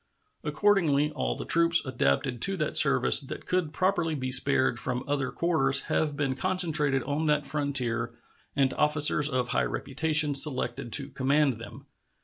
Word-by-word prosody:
Accordingly, 160 -8 +1
all - - -3
the - - -7
troops 170 -1 +2
adapted 120 - -2
to 195 -1 +1
that 155 -3 -3
service 140 -1 +6
that 135 - -9
could 180 -4 -2
properly 175 -2 -1
be 130 -2 -5
spared 130 -2 +2
from 125 0 -4
other 140 -2 -2
quarters 140 -5 +1
have 150 -2 -2
been 135 -2 -1
concentrated 150 -5 0
on 150 +3 -3
that 150 -1 0
frontier 125 -5 -2 0.4
and 135 -2 +1
officers 150 0 +2
of 125 -3 -2
high - - 0
reputation 150 +1 -1
selected 130 -4 0
to 140 -1 0
command 135 -2 0
them. 120 +4 -12
145 Hz, 150 wpm, -26 LUFS, 130-155 Hz, 0.4 s, service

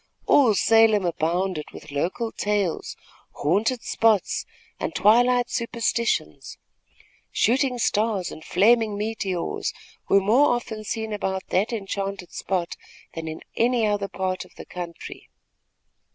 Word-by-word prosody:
All 245 -7 +5
Salem 225 -2 +4
abounded 170 0 -1
with 150 - -11
local 185 +11 -2
tales, 205 -4 -2 0.4
haunted 215 - 0
spots 220 -4 +1 0.3
and - - -3
twilight 245 +5 +4
superstitions. 230 - -1 0.7
Shooting 255 +2 +2
stars 210 -4 0
and 155 - -10
flaming 215 +2 +3
meteors 200 -4 -2 0.4
were 195 - +6
more 245 +7 +4
often 220 -3 -5
seen 220 0 -3
about 190 -2 -2
that 200 +6 +1
enchanted 195 -3 -4
spot, 180 -3 -2 0.4
than 165 -1 -6
in 160 0 -6
any 235 -1 +2
other 205 -1 0
part 185 -1 -3
of - - -20
the - - -10
country. 175 -2 -8
205 Hz, 120 wpm, -24 LUFS, 185-230 Hz, 0.7 s, were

